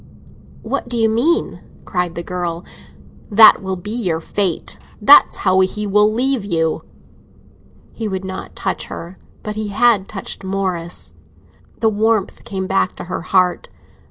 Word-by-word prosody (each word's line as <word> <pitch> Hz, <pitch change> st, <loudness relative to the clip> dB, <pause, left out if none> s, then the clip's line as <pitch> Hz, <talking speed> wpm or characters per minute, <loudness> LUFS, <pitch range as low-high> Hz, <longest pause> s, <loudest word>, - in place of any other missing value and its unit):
"What -, -, -3 dB
do 240 Hz, -, -2 dB
you 225 Hz, -1 st, +3 dB
mean?" 265 Hz, +11 st, +1 dB, 0.3 s
cried 180 Hz, -2 st, -2 dB
the 170 Hz, -, -4 dB
girl. 175 Hz, -1 st, -4 dB, 0.6 s
"That 220 Hz, 0 st, +7 dB
will 190 Hz, -1 st, -3 dB
be 185 Hz, +4 st, -7 dB
your 190 Hz, -9 st, -1 dB
fate—that's 205 Hz, -, +3 dB
how 185 Hz, -1 st, +2 dB
he 200 Hz, +3 st, 0 dB
will 210 Hz, +1 st, +3 dB
leave 255 Hz, +1 st, 0 dB
you." 165 Hz, -5 st, -1 dB, 1.1 s
He 225 Hz, -, -4 dB
would 190 Hz, -1 st, -4 dB
not 190 Hz, 0 st, -7 dB
touch -, -, -3 dB
her, 175 Hz, +3 st, -9 dB, 0.2 s
but 210 Hz, 0 st, -5 dB
he 215 Hz, 0 st, -3 dB
had 205 Hz, -1 st, +3 dB
touched 195 Hz, -2 st, -5 dB
Morris. 185 Hz, -3 st, -3 dB, 0.7 s
The 225 Hz, -, +4 dB
warmth 215 Hz, -1 st, 0 dB
came 190 Hz, -2 st, -4 dB
back 190 Hz, 0 st, 0 dB
to -, -, -7 dB
her 175 Hz, -, -5 dB
heart. 180 Hz, 0 st, +1 dB
195 Hz, 145 wpm, -18 LUFS, 180-220 Hz, 1.1 s, That